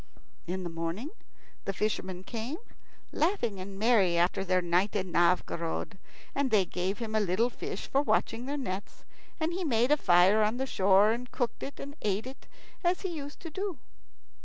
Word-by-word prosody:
In 185 Hz, +2 st, -2 dB
the 175 Hz, -, -3 dB
morning 165 Hz, -, -3 dB, 0.5 s
the 195 Hz, -, -1 dB
fishermen 190 Hz, -3 st, -2 dB
came, 235 Hz, +8 st, -4 dB, 0.5 s
laughing 300 Hz, -, 0 dB
and 195 Hz, +1 st, -7 dB
merry 200 Hz, -6 st, +4 dB
after 175 Hz, +2 st, +2 dB
their 185 Hz, -1 st, +2 dB
night 180 Hz, +4 st, +1 dB
in 185 Hz, -3 st, -1 dB
Novgorod, 170 Hz, +2 st, +1 dB, 0.3 s
and 280 Hz, -1 st, +1 dB
they 205 Hz, -5 st, +4 dB
gave 180 Hz, +3 st, -2 dB
him 225 Hz, -2 st, -4 dB
a 215 Hz, -, +3 dB
little 210 Hz, +5 st, +2 dB
fish -, -, -5 dB
for 275 Hz, -, +2 dB
watching 245 Hz, -4 st, 0 dB
their 290 Hz, +1 st, -2 dB
nets; 200 Hz, -7 st, -5 dB, 0.4 s
and 320 Hz, +1 st, 0 dB
he 370 Hz, +1 st, -2 dB
made 245 Hz, -3 st, +2 dB
a 300 Hz, -, +6 dB
fire 185 Hz, -1 st, +5 dB
on 215 Hz, +3 st, +2 dB
the 265 Hz, -, -1 dB
shore, 200 Hz, -2 st, +4 dB
and 240 Hz, +2 st, -3 dB
cooked 245 Hz, -2 st, -2 dB
it 280 Hz, -, -6 dB
and 285 Hz, +1 st, -7 dB
ate 205 Hz, +1 st, 0 dB
it 260 Hz, +1 st, -10 dB, 0.4 s
as 355 Hz, +1 st, +2 dB
he 380 Hz, -, -2 dB
used 290 Hz, -1 st, -7 dB
to 330 Hz, -, -7 dB
do. 380 Hz, -1 st, -3 dB
215 Hz, 185 wpm, -30 LUFS, 185-270 Hz, 0.5 s, a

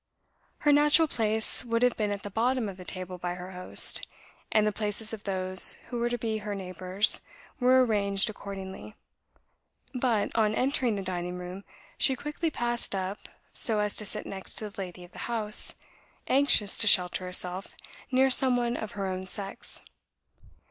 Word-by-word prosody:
Her 295 Hz, -, +4 dB
natural 295 Hz, +2 st, +5 dB
place 220 Hz, -4 st, +2 dB
would 230 Hz, 0 st, 0 dB
have 250 Hz, -1 st, +3 dB
been 210 Hz, -2 st, -1 dB
at 200 Hz, 0 st, -4 dB
the 205 Hz, -, -6 dB
bottom 240 Hz, +2 st, 0 dB
of 195 Hz, -2 st, -7 dB
the 185 Hz, -, -10 dB
table 185 Hz, 0 st, -6 dB
by 175 Hz, 0 st, -3 dB
her 180 Hz, +1 st, -8 dB
host; 180 Hz, 0 st, -2 dB, 0.4 s
and 215 Hz, -, +3 dB
the 210 Hz, -, +2 dB
places 215 Hz, +1 st, -1 dB
of 215 Hz, -, -8 dB
those 185 Hz, -1 st, +2 dB, 0.2 s
who 245 Hz, -, -4 dB
were 240 Hz, 0 st, 0 dB
to 240 Hz, -, -2 dB
be 220 Hz, -1 st, -2 dB
her 210 Hz, -1 st, -5 dB
neighbours 185 Hz, +2 st, +2 dB, 0.4 s
were 255 Hz, 0 st, +5 dB
arranged 200 Hz, -3 st, +2 dB
accordingly; 200 Hz, -1 st, -8 dB, 1.0 s
but, 240 Hz, -5 st, 0 dB
on 215 Hz, -1 st, +2 dB
entering 255 Hz, -3 st, 0 dB
the 195 Hz, -, -4 dB
dining 180 Hz, -1 st, -4 dB
room, 180 Hz, +2 st, -8 dB, 0.4 s
she 265 Hz, -, +3 dB
quickly 300 Hz, +5 st, -3 dB
passed 240 Hz, -6 st, -2 dB
up 190 Hz, +1 st, -5 dB, 0.2 s
so 220 Hz, -3 st, +4 dB
as 210 Hz, -1 st, -1 dB
to 210 Hz, -, -2 dB
sit -, -, -4 dB
next 190 Hz, -1 st, -5 dB
to 215 Hz, -2 st, -6 dB
the 200 Hz, -, -13 dB
lady 180 Hz, -1 st, -8 dB
of 175 Hz, -, -15 dB
the -, -, -12 dB
house, 215 Hz, -3 st, -1 dB, 0.5 s
anxious 265 Hz, -7 st, +4 dB
to 220 Hz, -, +5 dB
shelter 180 Hz, -2 st, +4 dB
herself 180 Hz, +1 st, +3 dB, 0.4 s
near 265 Hz, +1 st, +3 dB
some 255 Hz, -1 st, +4 dB
one 240 Hz, 0 st, -1 dB
of 215 Hz, -, -6 dB
her 200 Hz, -1 st, -3 dB
own 185 Hz, 0 st, -4 dB
sex. 195 Hz, +1 st, -4 dB
210 Hz, 175 wpm, -28 LUFS, 190-240 Hz, 1.0 s, natural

